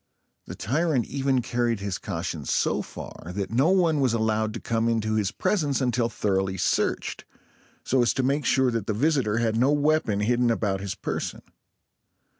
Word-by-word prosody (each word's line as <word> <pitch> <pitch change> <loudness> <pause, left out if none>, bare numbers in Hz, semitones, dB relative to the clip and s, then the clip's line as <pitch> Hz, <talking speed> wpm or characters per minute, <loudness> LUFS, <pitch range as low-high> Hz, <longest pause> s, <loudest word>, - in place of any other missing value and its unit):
The - - -7
tyrant 140 - 0
even 135 -2 0
carried 120 -2 0
his 100 -2 -3
caution - - -4
so - - +1
far, 85 - -9
that 100 0 -3
no 130 +8 +3
one 175 -5 +3
was 130 -4 +2
allowed 110 -1 0
to - - -4
come 115 0 0
into 110 -1 0
his 105 -3 +1
presence 150 - 0
until 125 -2 +1
thoroughly 95 -3 -1
searched, - - -1 0.6
so 130 -1 +2
as 120 - +3
to 130 - 0
make 140 +3 +1
sure 130 -2 +3
that 115 -4 -3
the 110 - -1
visitor 130 -4 +1
had 115 -1 +1
no 130 +4 +3
weapon 145 -8 +1
hidden 120 +2 +2
about 100 -4 0
his 100 -1 -4
person. - - -4
115 Hz, 175 wpm, -25 LUFS, 110-135 Hz, 0.6 s, no